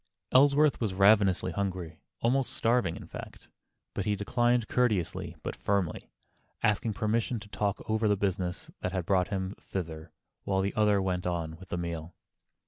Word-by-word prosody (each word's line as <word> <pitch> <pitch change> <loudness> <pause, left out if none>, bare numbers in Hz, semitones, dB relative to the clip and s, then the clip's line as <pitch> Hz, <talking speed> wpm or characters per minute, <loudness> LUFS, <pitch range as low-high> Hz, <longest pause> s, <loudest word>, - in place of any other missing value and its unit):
Ellsworth 140 +2 +5
was 105 -5 -1
ravenously 100 -2 +4
hungry, 90 -3 -3 0.2
almost 130 +3 +2
starving, 115 -8 +2
in - - -9
fact, - - -10 0.4
but 100 - -2
he 105 +1 +1
declined 120 +3 +1
courteously 95 -8 0
but - - -4
firmly, 100 -5 -1 0.5
asking 105 +1 +2
permission 110 +3 0
to 100 - -11
talk 100 0 -2
over 110 0 +1
the 105 -1 +3
business 95 -2 -2
that 90 - -3
had 90 -3 -2
brought 90 -1 +2
him 95 0 -3
thither, 80 -3 -6 0.3
while 95 -1 +1
the 100 +1 -1
other 105 -2 +3
went 90 -1 -1
on 85 -2 -2
with 95 +2 -13
the - - -2
meal. 85 -1 -5
100 Hz, 160 wpm, -29 LUFS, 90-110 Hz, 0.5 s, Ellsworth